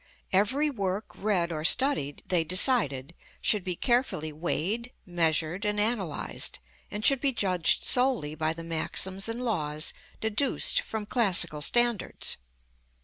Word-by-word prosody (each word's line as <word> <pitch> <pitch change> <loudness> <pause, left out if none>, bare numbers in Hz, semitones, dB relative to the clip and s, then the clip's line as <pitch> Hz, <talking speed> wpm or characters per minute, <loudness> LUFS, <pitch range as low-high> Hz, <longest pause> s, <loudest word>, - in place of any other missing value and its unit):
Every 260 +11 +2
work 200 -3 -4
read 185 -5 -1
or 155 -2 -4
studied, 175 - +4
they 175 -3 +1
decided, 170 - +2 0.3
should 210 -3 0
be 180 -1 -3
carefully 235 - 0
weighed, 190 +9 -3
measured 170 +1 0
and 210 -1 -1
analyzed, 205 -8 -2 0.3
and 210 +1 -5
should 275 -2 +5
be 280 - +2
judged 185 -7 +1
solely 245 - 0
by 155 +1 -1
the 165 0 -9
maxims 185 +5 0
and 240 +2 -4
laws 155 -8 -2 0.3
deduced 265 - +2
from 220 - -6
classical 185 -9 +2
standards. 240 +4 0
195 Hz, 130 wpm, -27 LUFS, 165-235 Hz, 0.3 s, should